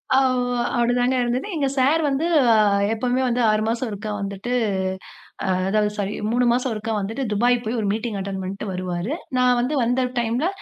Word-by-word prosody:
ஆமா. 250 -2 +2 0.2
அப்பிடிதாங்க 245 +1 +2
இருந்தது. 245 +8 -1
எங்க 285 -3 +1
சார் 280 +5 +3
வந்து 280 +3 0 0.7
எப்பவுமே 250 +3 0
வந்து 245 0 0
6 215 0 +1
மாசம் 235 +2 -1
ஒருக்கா 210 +1 -5
வந்துட்டு 200 +4 -5 1.2
அதாவது 210 +1 +2
சாரி 205 0 -2 0.2
3 245 +2 +2
மாசம் 250 +1 0
ஒருக்கா 220 +1 -3
வந்துட்டு 225 +7 -3
துபாய் 240 +4 +3
போய் 230 +2 -2
ஒரு 210 - -1
மீட்டிங் 220 0 -3
அட்டன் 195 0 -4
பண்ணிட்டு 195 +3 -5
வருவாரு. 180 +5 -3 0.2
நான் 250 -1 +3
வந்து 260 +5 -1
வந்த 245 +2 +1 0.2
டைம்ல 240 +6 0
240 Hz, 165 wpm, -22 LUFS, 210-250 Hz, 1.2 s, சார்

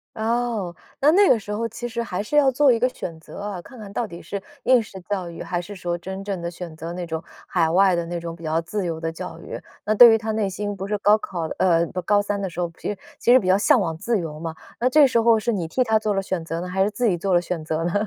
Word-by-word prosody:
哦， 225 -5 -1 0.2
那 295 +2 +5
那 395 +3 +5
个 230 - +5
时 205 0 -8
候 225 +2 -1
其 240 +2 -5
实 235 0 -3
还 200 -4 -3
是 295 - -4
要 275 -2 +5
做 270 +1 +4
一 230 - +2
个 250 +2 +3
选 165 -9 -7
择 160 - -11
啊， 200 -3 -5
看 255 - -14
看 205 -2 -9
到 235 0 -1
底 170 -2 -10
是 200 - -5 0.2
应 255 -2 +5
试 205 -3 -10
教 185 -2 -3
育， 170 - -7
还 175 -1 -2
是 205 +3 -9
说 175 -2 -2
真 190 +2 -6
正 195 -3 -4
地 170 - -3
选 170 -2 -8
择 165 +1 -6
那 175 0 -4
种 160 -1 -4 0.2
海 170 -3 +2
外 185 +2 +4
的 170 - -1
那 175 0 -3
种 170 0 -6
比 170 - -14
较 160 +1 0
自 190 +3 -3
由 165 -2 -3
的 165 0 -2
教 165 -1 -7
育。 - - -7 0.3
那 215 - +2
对 235 +2 +9
于 225 - +5
他 220 0 -3
内 215 -2 0
心 205 +2 -4
不 195 +1 -5
是 210 0 -1
高 205 +1 +5
考 180 -4 -5 0.2
呃， 170 -2 +4
不 180 - -4
高 205 +2 +3
三 205 0 -2
的 195 - -2
时 175 - -8
候， 170 -1 -1
其 - - -4
实 205 - -3 0.2
其 240 - +3
实 255 - +8
比 185 - -4
较 185 - +5
向 255 +5 +4
往 165 -5 -1
自 230 +4 0
由 155 -3 -5
嘛， 165 0 -5 0.2
那 250 - +2
这 295 +2 +7
时 235 -3 +2
候 230 -1 +5
是 235 +2 0
你 180 -5 -2
替 255 +10 +1
他 220 -2 +2
做 215 -1 0
了 195 - 0
选 185 -3 -3
择 165 0 -4
呢， 180 - -4
还 190 +1 +1
是 205 - +1
自 215 +4 -2
己 185 - +2
做 185 +2 -1
了 - - +6
选 175 -2 -4
择 155 +1 -2
呢？ 175 - -1
195 Hz, 325 characters per minute, -23 LUFS, 170-220 Hz, 0.3 s, 对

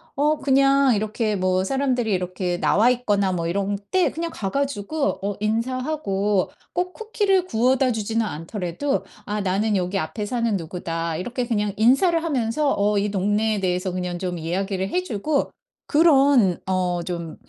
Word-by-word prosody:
어 300 +2 +2
그냥 275 -2 +4
이렇게 215 +1 -1
뭐 185 0 +1
사람들이 255 -4 0
이렇게 180 -1 -2
나와 230 +4 +4
있거나 205 -6 +1
뭐 170 -1 -2
이럴 200 +3 -1 0.2
때 370 -1 +3
그냥 335 +1 -4
가 195 -2 -4
가지고 280 +1 -1
어 200 0 -2
인사하고 220 -3 0 0.2
꼭 360 +1 -1
쿠키를 405 -4 +1
구워다 255 0 +2
주지는 225 0 -1
않더라도 180 - -3 0.2
"아 210 0 -2
나는 200 +3 0
여기 185 +1 0
앞에 160 +7 -4
사는 230 -1 0
누구다." 165 -1 -3
이렇게 245 +6 -3
그냥 210 -4 -1
인사를 295 - +3
하면서 280 -1 0
어 205 +1 +2
이 200 0 0
동네에 210 +2 +1
대해서 185 0 -1
그냥 180 -1 -3
좀 180 -1 -3
이야기를 190 +3 -2
해 365 - 0
주고 280 - -1 0.4
그런 280 - +4
어 180 -2 0
좀 170 -2 -5
210 Hz, 320 characters per minute, -23 LUFS, 185-270 Hz, 0.4 s, 그냥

